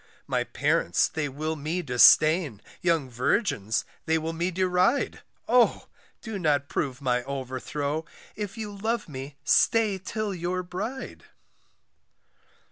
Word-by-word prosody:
My - - 0
parents 85 - +1
they 155 -2 -3
will 155 +4 -3
me 160 +4 -3
disdain, 150 - +5 0.2
Young 165 -6 +1
virgins 125 - 0 0.2
they 160 0 +3
will 160 +1 -3
me 170 +2 -1
deride, 185 +7 +1 0.3
Oh! 245 0 +3 0.3
do 220 -3 -5
not 145 -5 +1
prove 140 -1 -3
my 125 -1 +1
overthrow, 140 +3 -3 0.3
If 210 +1 -5
you 210 -2 -5
love 220 +1 -2
me 140 -1 -7
stay 215 +3 +3
till 210 +2 -3
your 180 +1 -2
bride. 205 +9 -6
160 Hz, 125 wpm, -27 LUFS, 140-195 Hz, 0.3 s, disdain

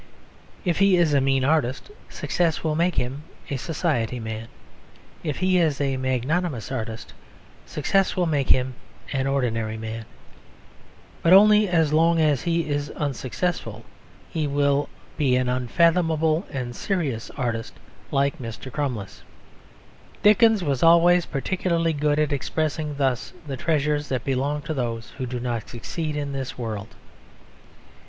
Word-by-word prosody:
If 175 -2 +1
he 195 -2 +5
is 165 -4 +3
a 140 - +4
mean 135 -1 +2
artist 145 - 0 0.2
success 170 -3 -1
will 155 -1 +1
make 170 +3 +1
him 130 +4 -2 0.3
a 140 - 0
society 130 -6 -1
man. 110 0 -5 0.8
If 150 -4 -2
he 185 -1 +2
is 155 -5 +1
a 135 -2 0
magnanimous 130 - -1
artist, 115 -3 -5 0.5
success 195 +6 +1
will 180 - +1
make 145 -5 0
him 130 0 +3 0.4
an 135 -1 0
ordinary 115 -5 -1
man. 110 0 -6 1.2
But 170 - +5
only 210 +1 +7
as 160 -4 +2
long 165 +1 +4
as 150 -4 +3
he 170 -2 0
is 145 -1 -2
unsuccessful 130 - -3 0.5
will 145 -2 +1 0.3
he - - +1
be 130 -3 +3
an 125 0 +1
unfathomable 160 - +2
and 125 -3 -4
serious 150 - -2
artist, 115 -3 -3 0.3
like 140 0 +1
Mr. 120 +2 -7
Crummles. 125 -8 -4 1.0
Dickens 215 -1 +5
was 140 -5 -1
always 170 +1 +5
particularly 165 +2 0
good 145 0 +1
at 150 -1 +1
expressing 155 +1 -2
thus 135 -3 -1
the 140 -2 -4
treasures 150 +1 0
that 130 -3 -1
belong 140 +2 -1
to 155 +2 -3
those 115 -4 -3
who 130 - -2
do 125 0 -4
not 120 -3 -3
succeed 150 +6 -4
in 145 -1 -3
this 135 -2 -5
world. 110 -3 -5
145 Hz, 140 wpm, -24 LUFS, 125-165 Hz, 1.2 s, only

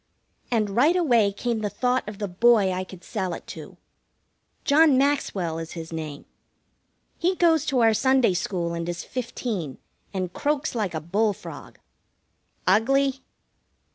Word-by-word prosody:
And 215 -4 0
right 285 - +4
away 240 - +3
came 230 +3 -2
the 210 -1 -2
thought 250 0 0
of 210 - -9
the 205 -1 -3
boy 205 +1 +4
I 185 0 -2
could 185 -1 -12
sell 185 -5 -3
it - - -11
to. - - -11 0.9
John 300 -2 +5
Maxwell 205 - 0
is 165 0 -7
his 165 -1 -7
name. 155 -3 -6 0.9
He 360 +2 +1
goes 325 -4 +3
to 265 -4 +2
our 225 -1 +5
Sunday 260 -3 +3
school 175 -1 -2
and 170 0 -3
is 175 - -4
fifteen, 225 - -4 0.3
and 185 -2 -3
croaks 295 +1 -1
like 210 -8 -2
a 160 - -2
bull 205 +7 +1
frog. - - -11 0.9
Ugly? 270 +7 +3
215 Hz, 150 wpm, -25 LUFS, 180-265 Hz, 0.9 s, John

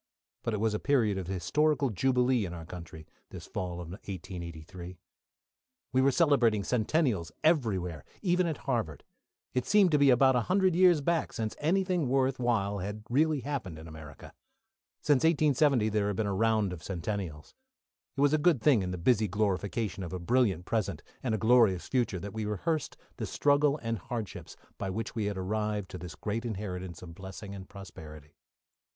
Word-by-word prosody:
But 115 - -1
it - - -3
was 110 0 +1
a 105 - -1
period 115 -9 +2
of 90 - -6
historical 140 - +1
jubilee 125 +3 +2
in 90 -2 -5
our 80 -1 -8
country, 80 -2 -9 0.2
this - - -9
fall 90 -1 -4
of 85 -1 -7
1883. 90 -2 -8 1.0
We 130 - +4
were 135 - +5
celebrating 130 - +3
centennials 110 - 0
everywhere, 100 - +1 0.2
even 180 -1 +2
at 160 - -4
Harvard. 115 - -2 0.5
It 125 -1 -1
seemed 205 -4 +5
to 150 - +4
be 140 -1 +6
about 130 +1 +5
a - - +4
hundred 190 -1 +3
years 175 -3 +5
back 165 +2 0
since 110 -1 -3
anything 180 -2 +1
worth 130 0 +1
while 105 -5 0
had 105 +3 -5
really 150 +2 +2
happened 130 - -4
in 80 +1 -10
America. 80 -2 -11 0.7
Since 145 -3 +4
1870 145 -7 +3
there 105 -1 0
had 105 - -1
been 110 - 0
a 100 - -1
round 110 -2 +2
of 85 - -8
centennials. 90 -4 -5 0.6
It - - 0
was 145 +1 +4
a 155 - +3
good 160 -3 +3
thing 120 -2 +4
in 90 - -3
the 90 - -3
busy 110 +4 +2
glorification 100 +1 -1
of 90 -1 -6
a - - -2
brilliant 95 -3 +1
present, 110 -1 -2 0.2
and 115 -4 0
a - - -1
glorious 110 -4 +4
future, 120 -8 0
that 100 +3 -7
we 110 -1 -3
rehearsed 125 - -2 0.2
the - - -3
struggle 145 0 +3
and 115 -1 -2
hardships 110 +3 -6 0.2
by 95 - -2
which 110 +4 -4
we 110 -3 -2
had 100 -1 -2
arrived 105 +1 -2
to 90 - -7
this 90 0 -8
great 110 +4 -3
inheritance 95 -6 -5
of 85 -2 -9
blessing 95 +2 -9
and 95 -1 -9
prosperity. 75 -6 -11
110 Hz, 180 wpm, -30 LUFS, 95-135 Hz, 1.0 s, be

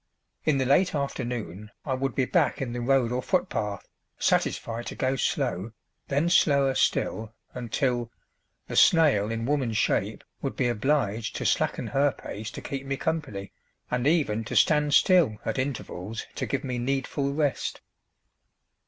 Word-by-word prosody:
In 155 -3 +3
the 130 - +1
late 160 +7 +3
afternoon 115 - -4 0.2
I 135 - -1
would 135 0 -2
be 130 - +2
back 165 +2 +1
in 125 -3 -3
the 120 - -3
road 125 -1 +2
or 125 +1 -1
footpath, 110 - -1 0.3
satisfied 115 +1 0
to - - -5
go 130 +1 0
slow, 105 -4 -1 0.3
then 145 +4 +1
slower 140 -6 +4
still, 110 -3 0 0.2
until 120 0 -1 0.6
the - - -5
snail 145 - +5
in 115 0 -2
woman 135 -4 0
shape 105 -1 0 0.2
would 135 - -3
be 125 -2 +1
obliged 115 -2 0
to - - -3
slacken - - +1
her 140 0 +2
pace 110 0 -7
to - - -8
keep 135 -1 -5
me 135 0 -1
company, 130 -13 -3 0.4
and 125 +2 +1
even 140 -9 +2
to - - -5
stand 150 -2 +4
still 165 - +4
at - - -1
intervals 115 -6 -4
to - - -3
give 135 -1 -2
me 125 -3 -3
needful 135 +2 -1
rest. 145 -3 -1
130 Hz, 155 wpm, -27 LUFS, 115-140 Hz, 0.6 s, snail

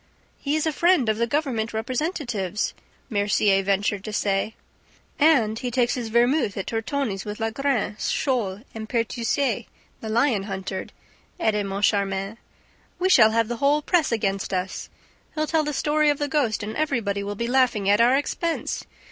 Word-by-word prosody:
"He 285 +1 -1
is 310 - 0
a 315 - +1
friend 335 -6 +3
of 215 - +1
the 235 - +1
government 240 -5 -1
representative's!" 235 - -2 0.3
Mercier 205 -2 +2
ventured 200 0 0
to 215 - -4
say. 205 +1 0 0.6
"And 245 -8 +4
he 250 - -3
takes 245 0 +1
his 245 -3 -3
vermouth 240 0 +2
at 195 - -3
Tortoni's 225 -3 -2
with 210 0 -6
Lagrene, 225 -1 -1
Scholl 225 -7 -1
and 220 -1 -7
Pertuiset, 235 0 -1 0.3
the 220 - -6
lion 225 -3 +2
hunter," 190 -1 -4 0.5
added 210 - +1
Moncharmin. 195 +1 0 0.6
"We 370 +1 +1
shall 220 -12 +7
have 225 0 +1
the 240 0 -3
whole 290 +4 +2
press 335 -4 +2
against 195 -4 -1
us! 185 +1 -4 0.5
He'll 310 0 0
tell 315 0 +1
the 300 - -2
story 300 +1 +2
of 290 - +2
the 290 - -1
ghost; 265 -8 0
and 215 +1 -5
everybody 235 -10 -1
will 205 +1 -4
be 235 - -2
laughing 240 -5 +2
at 205 +3 +4
our 250 +3 +5
expense! 330 +3 -2
230 Hz, 165 wpm, -24 LUFS, 205-280 Hz, 0.6 s, shall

